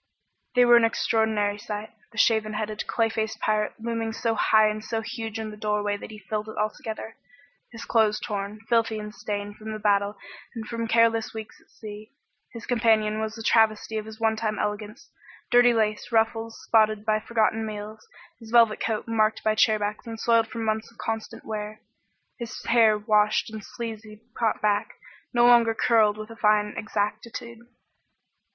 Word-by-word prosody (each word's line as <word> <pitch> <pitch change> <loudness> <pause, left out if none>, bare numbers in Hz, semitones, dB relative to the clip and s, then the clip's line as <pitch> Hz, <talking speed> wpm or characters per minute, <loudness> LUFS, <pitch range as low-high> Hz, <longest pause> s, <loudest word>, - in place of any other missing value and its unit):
They 250 0 +6
were 240 0 +7
an 235 - +4
extraordinary 220 -2 +1
sight. 210 +1 -6 0.2
The 230 - -15
shaven 220 -1 +3
headed, 215 0 -4
clay 225 -1 +1
faced 220 -1 -3
pirate 215 0 0
looming 230 0 -3
so 230 0 -1
high 215 0 +4
and 215 0 -3
so 225 0 -2
huge 225 -1 -5
in 220 -1 -5
the - - -9
doorway 210 -1 -1
that 205 - -9
he 215 - -10
filled 210 +2 -4
it - - -9
altogether, 220 +1 -4 0.5
his 230 -1 -9
clothes 215 -2 +2
torn, 205 +1 -5
filthy 230 -1 +2
and 210 0 -7
stained 205 -1 -5
from 220 0 -7
the - - -4
battle 205 -1 +1 0.4
and 225 -1 -5
from 230 +1 -4
careless 225 -1 +2
weeks 220 -1 -8
at - - -29
sea. 215 +2 -10 0.4
His 230 -1 -9
companion 220 -3 +2
was 220 +1 -4
a 225 - -7
travesty 220 0 +2
of 215 - -7
his 220 0 -9
onetime 220 -1 0
elegance, 210 +5 -4 0.4
dirty 245 0 +6
lace 215 0 0
ruffles 225 0 0
spotted 215 -1 +3
by 215 0 +2
forgotten 225 0 0
meals, 215 0 -7 0.3
his 225 - -12
velvet 230 -2 +5
coat 220 0 -2
marked 220 -1 +1
by 215 - +2
chairbacks 215 0 +1
and 225 -1 -6
soiled 230 -1 +3
from 230 0 -5
months 220 +1 -2
of 230 - -25
constant 225 -1 -5
wear, 215 0 -5 0.6
his 235 +1 -6
hair 230 -2 +5
unwashed 210 0 +2
and 215 -1 -7
sleazily 225 -3 -8
caught 225 -2 0
back, 205 -1 +1 0.4
no 240 -1 +4
longer 235 -2 +5
curled 220 -3 +3
with 215 +1 -8
a - - -9
fine 210 -2 +2
exactitude. 215 +2 -4
220 Hz, 175 wpm, -25 LUFS, 210-225 Hz, 0.6 s, were